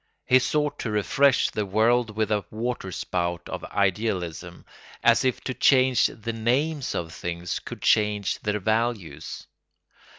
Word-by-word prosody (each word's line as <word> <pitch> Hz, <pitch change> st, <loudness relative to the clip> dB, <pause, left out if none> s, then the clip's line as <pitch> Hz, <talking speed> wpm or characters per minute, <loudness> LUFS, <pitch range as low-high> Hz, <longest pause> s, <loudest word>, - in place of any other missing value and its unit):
He 130 Hz, -, +5 dB
sought 150 Hz, +3 st, -1 dB
to 115 Hz, -, -3 dB
refresh 125 Hz, +6 st, +2 dB
the 105 Hz, -, -1 dB
world 110 Hz, +3 st, +2 dB
with 110 Hz, -1 st, 0 dB
a 105 Hz, -2 st, +1 dB
water 115 Hz, -3 st, -4 dB
spout 85 Hz, -1 st, -3 dB
of -, -, -6 dB
idealism, 90 Hz, -4 st, -2 dB, 0.4 s
as -, -, +5 dB
if 130 Hz, -2 st, 0 dB
to 130 Hz, -, -4 dB
change 130 Hz, 0 st, +4 dB
the 115 Hz, +1 st, -6 dB
names 130 Hz, +6 st, 0 dB
of 85 Hz, -1 st, -4 dB
things 85 Hz, 0 st, -4 dB
could -, -, -9 dB
change 105 Hz, -2 st, +2 dB
their 105 Hz, 0 st, -1 dB
values. 110 Hz, -8 st, -2 dB
110 Hz, 140 wpm, -25 LUFS, 95-125 Hz, 0.4 s, He